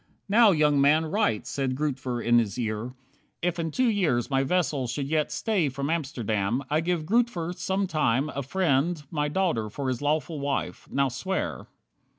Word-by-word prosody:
"Now, 220 +2 +6
young 150 -5 +3
man, 155 +3 +4
write," 155 - 0
said 135 -2 -2
Grootver 130 -4 -2
in 120 0 +5
his 105 -2 -2
ear. 115 +1 -3 0.5
"`If 175 -1 0
in 165 -1 -1
two 255 +11 +1
years 160 - +1
my 135 0 +3
vessel 140 -4 0
should 135 +3 -3
yet 155 0 0
stay 195 -10 0
From 140 +3 -3
Amsterdam, 120 -6 -1
I 155 +1 +3
give 170 -2 -1
Grootver, 190 -4 +1
sometime 170 -8 0
A 140 - -4
friend, 155 +1 0
my 150 -3 0
daughter 150 - 0
for 135 +5 -3
his 125 0 -2
lawful 155 +1 -1
wife.' 140 0 -3
Now 140 -1 +2
swear." 190 +10 -3
150 Hz, 165 wpm, -26 LUFS, 130-175 Hz, 0.5 s, Now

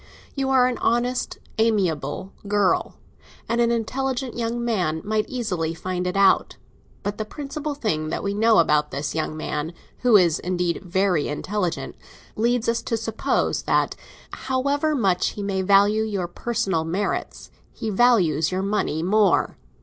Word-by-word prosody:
You 270 -1 -1
are 260 -2 +5
an 250 -1 -1
honest, 245 +2 0 0.2
amiable 190 -6 0
girl, 205 -2 +1 0.5
and 235 +1 +1
an 235 - +3
intelligent 250 +2 -2
young 235 0 -2
man 175 -9 0
might 215 0 0
easily 180 -10 -2
find 180 +1 -3
it 180 +2 -2
out. 195 -1 +3 0.5
But 205 +1 -3
the - - 0
principal 290 +5 -5
thing 155 - -1
that - - -3
we 200 0 -1
know 220 +2 +4
about 150 -2 +3
this 145 +2 -3
young 155 -1 -2
man—who 165 +10 0
is, 170 -4 +3
indeed, 180 -1 -1
very 185 -3 +1
intelligent—leads 210 +6 -3
us 230 0 +1
to 230 - -2
suppose 225 0 -1
that, - - +1 0.4
however 280 +4 0
much 195 -8 +1
he 205 - -5
may 195 -1 -1
value 200 +3 +4
your 200 -5 -2
personal 190 -3 -1
merits, 185 +5 -3 0.2
he 220 - -4
values 185 -9 +3
your 185 +1 -1
money 195 -6 -1
more. 200 +1 +3
205 Hz, 145 wpm, -23 LUFS, 175-235 Hz, 0.5 s, are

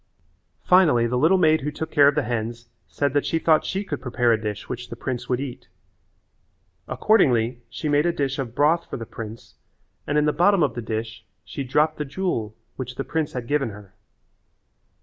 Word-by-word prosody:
Finally 160 -11 +5
the 120 +1 -1
little 160 +9 +4
maid 160 -3 +4
who 145 - -2
took 160 +2 -5
care 145 -2 +6
of 145 - +3
the 150 - +1
hens 120 0 -4 0.2
said 140 -2 -1
that 145 - +2
she 165 - 0
thought 160 -1 +3
she 195 +2 -2
could 145 -9 -5
prepare 120 -2 +1
a 110 - -1
dish 105 -2 -5
which 125 -1 -6
the - - -6
prince 120 +1 -5
would 125 -1 +1
eat. 135 -3 -7 1.2
Accordingly 125 - +2
she 155 - -5
made 145 +2 +3
a - - +3
dish 140 -4 -2
of 120 -3 -4
broth 160 +4 +2
for - - -4
the 115 - -6
prince 110 0 -9 0.5
and 150 - +1
in 150 - +3
the 150 - +2
bottom 195 0 +4
of 140 -6 +1
the 120 - -5
dish 110 0 -5 0.2
she 140 - -5
dropped 150 +4 +1
the - - 0
jewel 135 - -3 0.2
which 125 -1 -5
the - - -3
prince 150 +2 -2
had 125 -2 -4
given 145 -3 +1
her. 100 -2 -12
135 Hz, 205 wpm, -23 LUFS, 120-155 Hz, 1.2 s, care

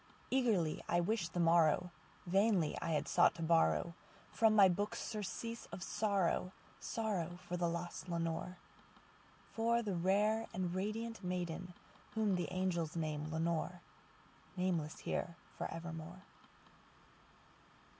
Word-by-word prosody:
Eagerly 220 -12 +2
I 175 - +3
wished 180 -2 0
the 175 - -1
morrow;—vainly 175 +3 +2
I 165 - -1
had 150 - 0
sought - - +4
to 165 - -4
borrowFrom 170 +6 +1
my 200 -2 +9
books 205 +5 -1
surcease 230 +2 -4
of 180 - -7
sorrow—sorrow 195 -1 -1
for 180 - -2
the 175 -1 +1
lost 170 +2 -5
Lenore, 170 +1 -2 1.0
For 235 +1 +2
the 205 -3 -2
rare 205 +5 +2
and 180 -1 -1
radiant 215 +3 -3
maiden 180 0 -3 0.4
whom 215 -3 +2
the 180 -1 0
angels 180 -4 -1
name 155 -2 -2
Lenore:Nameless 170 0 -3
here 170 - -2 0.2
for - - -4
evermore. 165 +2 -7
180 Hz, 110 wpm, -36 LUFS, 170-205 Hz, 1.0 s, my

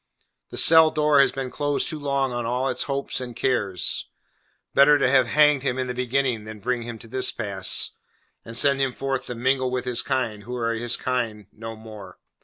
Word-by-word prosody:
The - - -9
cell 160 -1 +7
door 150 -2 +2
has 140 - +3
been 135 -2 -5
closed 145 -1 0
too 155 -3 -2
long 140 -2 -1
on 120 0 -3
all 125 +3 -1
its 130 - -2
hopes 140 -1 -2
and 120 -2 -7
cares. 100 -8 0 0.6
Better 145 +1 +6
to - - +2
have 130 -2 +4
hanged 150 +1 +4
him 130 -2 -2
in 130 - -1
the 125 - -4
beginning 125 -2 -1
than 110 0 -9
bring 125 +3 -2
him 115 -1 -7
to 115 - -13
this 130 +2 +1
pass, 100 -4 -1 0.5
and 115 0 -5
send 140 +1 +3
him 135 -2 0
forth 135 0 -3
to 125 - -5
mingle 130 +2 0
with 125 0 -3
his 125 -1 0
kind, 115 -5 -2
who 120 +4 -7
are 115 -1 -1
his 120 +1 -2
kind 115 -5 -3
no 115 +1 -8
more. 110 -4 -12
125 Hz, 205 wpm, -24 LUFS, 115-135 Hz, 0.6 s, cell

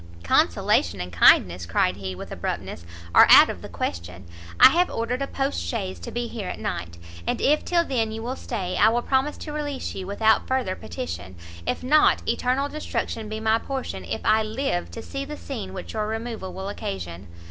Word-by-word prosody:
"Consolation 85 +1 +2
and 90 0 -5
kindness," 85 0 +5
cried 90 +2 +1
he, 95 -2 -5
with - - -9
abruptness, 85 - -5 0.3
"are - - +8
out - - +9
of - - -9
the - - -9
question. 85 +2 -5 0.3
I - - +11
have 350 +5 +2
ordered 245 +3 -2
a 275 - -1
post 275 0 -2
chaise 90 +2 -4
to 85 - -7
be 240 0 -3
here 220 -5 -6
at - - -5
night, 85 -1 -4 0.3
and - - 0
if 300 +2 +3
till 340 -1 +2
then 230 -6 0
you 225 +1 -6
will 250 +2 -3
stay, 185 -9 -4
I 220 - +6
will 240 +1 0
promise 270 +2 0
to 300 - -7
release 290 -3 -4
you 185 -1 -6
without 220 +2 +2
further 260 -8 0
petition 90 - -6 0.3
if - - -2
not, 300 +4 +4
eternal 260 +3 +1
destruction 235 -7 -4
be 215 0 -4
my 220 +1 +2
portion 255 - -5
if 85 - -4
I 220 0 +4
live 220 -3 -2
to 230 - -8
see 275 0 -5
the 300 +2 -7
scene 215 -9 -6
which 185 -1 -7
your 215 -1 -1
removal 225 -3 -4
will 190 +1 -6
occasion!" 95 - -6
220 Hz, 200 wpm, -24 LUFS, -, 0.3 s, I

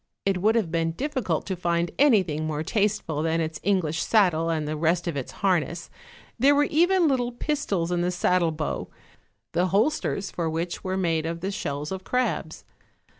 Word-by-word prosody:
It 195 -2 +1
would 220 +3 +3
have 205 -8 +1
been 165 -1 0
difficult 255 - -2
to 190 - -2
find 170 -1 0
anything 185 - +3
more 155 0 -2
tasteful 200 -5 0
than 165 +1 0
its 160 -1 -3
English 175 -5 0
saddle 175 -7 +3
and 155 -2 -1
the 155 - -2
rest 170 +3 +1
of 170 - -2
its 135 -3 -4
harness; 175 -2 0 0.5
there 280 +4 +5
were 290 - +4
even 345 +4 +3
little 250 -4 +1
pistols 235 - -2
in 175 -1 +1
the 175 - +1
saddle 180 -1 +2
bow, 155 -1 -4 0.6
the 175 +2 +1
holsters 205 0 0
for 165 -2 -2
which 165 +2 -3
were 185 0 -2
made 165 -4 0
of 165 0 -4
the 190 +2 -2
shells 145 -6 -4
of 190 0 -5
crabs. 250 +4 -2
175 Hz, 180 wpm, -25 LUFS, 165-215 Hz, 0.6 s, there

